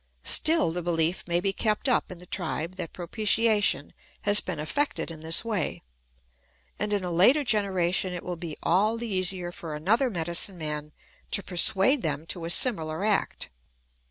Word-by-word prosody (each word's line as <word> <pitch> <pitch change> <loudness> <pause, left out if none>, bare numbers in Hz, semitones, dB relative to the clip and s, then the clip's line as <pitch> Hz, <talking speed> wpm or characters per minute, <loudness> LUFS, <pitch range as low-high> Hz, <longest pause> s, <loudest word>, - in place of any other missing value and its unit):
Still 315 - +3
the 175 +2 -3
behef 170 +1 0
may 170 0 +2
be 195 +2 0
kept 215 +5 -1
up 250 - +1
in 180 - -8
the 180 - -11
tribe 175 -1 -3
that 175 -4 -5
propitiation 215 +3 +1 0.3
has 205 0 +4
been 175 -4 -5
effected 165 - -1
in 160 - -10
this 160 +7 0
way; 210 -8 -3 1.0
and 210 0 -2
in 205 -2 0
a 180 - -3
later 245 - +5
generation 190 -5 +1
it 180 -1 -6
will 180 - -4
be 165 -2 -7
all 210 +6 +2
the 235 +1 -5
easier 185 -2 -1
for 165 -3 -7
another 220 - +1
medicine 175 0 -1
man 150 -1 -3 0.4
to 200 - +1
persuade 195 - +3
them 150 -2 -3
to 165 0 -3
a - - -4
similar 165 -3 +3
act. 210 -2 -1
180 Hz, 170 wpm, -26 LUFS, 165-210 Hz, 1.0 s, later